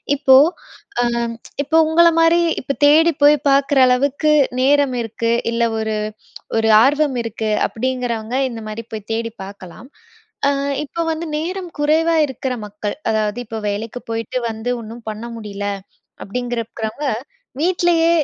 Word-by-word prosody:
இப்போ 270 -2 +5 0.7
அ - - +2 0.6
இப்போ 305 +3 +1
உங்கள 340 +2 +5
மாரி 330 +1 +5 0.2
இப்போ 275 - -3
தேடி 320 +3 +6
போய் 295 +1 +7
பார்க்குற 275 +1 +3
அளவுக்கு 280 +4 +2 0.3
நேரம் 280 -1 +3
இருக்கு. 230 0 -2 0.2
இல்ல 235 0 0 0.2
ஒரு 220 0 -2 0.6
ஒரு 225 0 +2
ஆர்வம் 290 -1 +2
இருக்கு, 220 -1 -3 0.2
அப்படிங்கிறவங்க 245 -1 -3
இந்த 230 -2 -7
மாதிரி 215 +2 -6
போய் 215 -1 -7
தேடி 230 0 -2
பார்க்கலாம். 200 +4 -11 0.6
அ - - +4 0.4
இப்போ 335 - -4
வந்து 320 +1 -3
நேரம் 360 +3 -4
குறைவா 315 +3 +2
இருக்கிற 265 -1 -4
மக்கள், 205 0 -5 0.2
அதாவது 215 +1 -1
இப்போ 225 0 -6
வேலைக்கு 220 +4 -4
போய்ட்டு 225 +2 -3
வந்து 220 +2 -4
ஒன்னும் 230 +2 -10
பண்ண 215 +2 -6
முடியல, 205 -2 -6 0.6
அப்படிங்கிறவங்க 235 +3 -4 0.5
வீட்டிலயே 345 -1 +2
245 Hz, 130 wpm, -19 LUFS, 220-295 Hz, 0.7 s, போய்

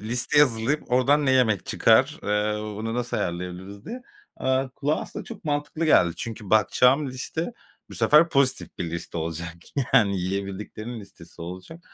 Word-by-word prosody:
listeyi 125 +7 +3
hazırlayıp 125 +4 -2
oradan 140 +3 +3
ne - - +4
yemek 115 -7 +2
çıkar, - - +3
eee, 105 +1 0 0.2
bunu 115 +1 -3
nasıl 120 0 -2
ayarlayabiliriz 90 +3 -5
diye. 245 +1 -7 0.3
Aaa, 130 0 0
kulağa 145 +4 -1
aslında - - -7
çok - - -10
mantıklı 150 +2 -2
geldi. 90 - +4
Çünkü 110 -2 -6
bakacağım 125 +6 +4
liste 160 - -4 0.4
bu - - -9
sefer 155 +3 +5
pozitif 140 -4 +1
bir 85 -2 -3
liste 85 0 -5
olacak 85 +1 -4 0.4
yani, 100 -3 +4
yiyebildiklerimin 100 +5 -5
listesi 85 -4 -13
olacak. 90 - -9
115 Hz, 150 wpm, -25 LUFS, 95-140 Hz, 0.4 s, sefer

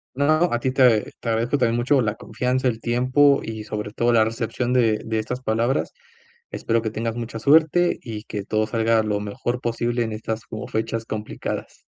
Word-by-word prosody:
No, 155 +5 +3
a 120 - +2
ti, 130 +2 -1
te 125 -5 +3
te - - -5
agradezco 115 +4 +1
también 115 -4 +1
mucho 130 +4 +3
la 105 -3 -1
confianza, 125 +2 -2
el 115 -2 -2
tiempo 130 +4 +3
y 110 -1 -5
sobre 105 -1 -5
todo, 120 +2 +1
la 110 -2 +5
recepción 115 +2 -2
de 115 -4 +3
de 110 0 -1
estas 125 +3 -4
palabras. 120 +2 0 0.6
Espero 115 0 -1
que 110 - -2
tengas 115 +1 -3
mucha 115 -1 -5
suerte, 160 +6 +4
y 110 -2 -7
que 105 - -5
todo 110 +1 0
salga 115 0 +2
lo 105 -1 -1
mejor 105 +4 -3
posible 120 0 -1
en 110 - -4
estas 110 +1 -4
como 110 +3 -6
fechas 115 +1 -2
complicadas. 110 -1 -5
115 Hz, 190 wpm, -23 LUFS, 110-125 Hz, 0.6 s, la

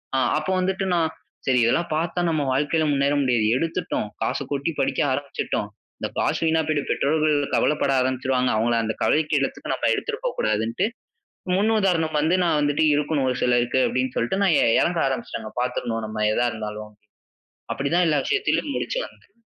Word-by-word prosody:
அ - - +3 0.2
அப்போ 155 +4 -2
வந்துட்டு 190 +1 -1
நான் 165 -2 +2 0.4
சரி 130 -1 +3
இதெல்லாம் 170 +9 +1
பார்த்தா 165 +3 -1
நம்ம 155 -2 0
வாழ்க்கைல 150 +4 +1
முன்னேற 140 0 +2
முடியாது. 120 -5 +2
எடுத்துட்டோம்! 165 -7 -2
காசு - - -1
கொட்டி 140 +3 -1
படிக்க - - 0
ஆரம்பிச்சுட்டோம்! 140 +1 -2 0.3
இந்த - - -2
காசு - - +1
வீணா 160 0 +3
போயிட்டு. 150 -2 0
பெற்றோர்கள் 155 +1 +2 0.2
கவலைப்பட 150 -2 +2
ஆரம்பிச்சுருவாங்க. 130 0 0
அவங்கள 115 +2 +1
அந்த 110 0 -2
கவலைக்கு 155 0 +2
இடத்துக்கு 135 - -3
நம்ம - - -1
எடுத்துட்டு 455 +1 -3
போகக்கூடாதுன்ட்டு. 110 - 0 0.7
முன் 210 +4 +2
உதாரணம் 165 -6 +1
வந்து 160 +4 +2
நான் 165 -3 +2
வந்துட்டு 145 +1 +2
இருக்கணும் 145 -2 0
ஒரு 125 - -1
சிலருக்கு 120 +1 +2
அப்படின்னு 130 0 -1
சொல்லிட்டு 155 +12 0
நான் 190 -4 +4
எ - - +4 0.2
இறங்க 170 -1 +1
ஆரம்பிச்சுட்டேங்க 120 -4 -4
பார்த்துரணும் 120 -2 -2
நம்ம 110 0 -3
எதா 120 +2 +2
இருந்தாலும். 105 -1 -7 0.8
அப்டி 140 0 -3
தான் 180 0 +4
எல்லா 155 - +2
விஷயத்திலயும் 405 -8 0
முடிச்சு - - -2
வந்தேன். - - -23
145 Hz, 165 wpm, -23 LUFS, 125-165 Hz, 0.8 s, நான்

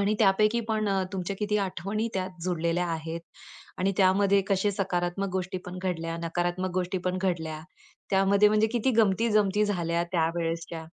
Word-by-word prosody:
आणि 205 +2 +2
त्यापैकी 215 +3 +3
पण 215 -1 0
अ, 195 -1 +1
तुमच्या 190 +1 -3
किती 210 0 0
आठवणी 200 +4 -2
त्यात 185 -2 -4
जुळलेल्या 175 0 0
आहेत. 165 0 -4 0.6
आणि 195 +2 +1
त्यामध्ये 195 +1 +4
कसे 195 +1 +2
सकारात्मक 190 0 -1
गोष्टी 185 0 -2
पण 180 +1 -6
घडल्या, 165 -2 -2
नकारात्मक 175 +2 -1
गोष्टी 185 +1 -1
पण 185 0 0
घडल्या. 160 -4 -2 0.5
त्यामध्ये 200 +2 +4
म्हणजे 215 +1 +3
किती 245 +2 +1
गमती-जमती 210 -1 +3
झाल्या 170 -4 0
त्यावेळेसच्या. 165 -1 -1
185 Hz, 150 wpm, -27 LUFS, 175-200 Hz, 0.6 s, त्यामध्ये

